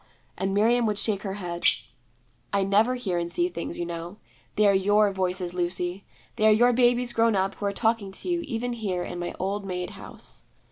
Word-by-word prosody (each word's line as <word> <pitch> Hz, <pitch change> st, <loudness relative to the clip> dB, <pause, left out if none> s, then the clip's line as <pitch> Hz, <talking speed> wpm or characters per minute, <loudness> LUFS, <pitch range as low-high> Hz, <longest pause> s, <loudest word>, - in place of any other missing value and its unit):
And 190 Hz, 0 st, -1 dB
Miriam 230 Hz, +4 st, +3 dB
would 210 Hz, -1 st, 0 dB
shake 200 Hz, -1 st, -1 dB
her 195 Hz, -1 st, -4 dB
head. 175 Hz, -3 st, -5 dB, 0.9 s
'I 200 Hz, -1 st, +3 dB
never 210 Hz, +6 st, +3 dB
hear 195 Hz, -8 st, -2 dB
and 170 Hz, 0 st, -3 dB
see 350 Hz, -, +1 dB
Things, -, -, -5 dB
you 175 Hz, -, -2 dB
know. 170 Hz, +3 st, -6 dB, 0.4 s
They 210 Hz, -, +3 dB
are 200 Hz, -, +6 dB
your 205 Hz, +2 st, +3 dB
Voices, 185 Hz, -2 st, -2 dB
Lucy; 180 Hz, +1 st, -2 dB, 0.3 s
they 215 Hz, -1 st, +4 dB
are -, -, +7 dB
your 240 Hz, +3 st, +5 dB
babies 245 Hz, 0 st, +3 dB
grown 230 Hz, -2 st, +3 dB
up 195 Hz, +1 st, +1 dB
who 205 Hz, -, -3 dB
are -, -, 0 dB
talking 220 Hz, -1 st, 0 dB
to 195 Hz, -, -6 dB
you 350 Hz, -1 st, +1 dB
even 245 Hz, -4 st, -3 dB
here 195 Hz, -6 st, -2 dB
in 175 Hz, -, -6 dB
my 175 Hz, -, -4 dB
old 200 Hz, +2 st, -2 dB
maid 180 Hz, -2 st, -4 dB
house.' -, -, -11 dB
200 Hz, 205 wpm, -26 LUFS, 185-225 Hz, 0.9 s, are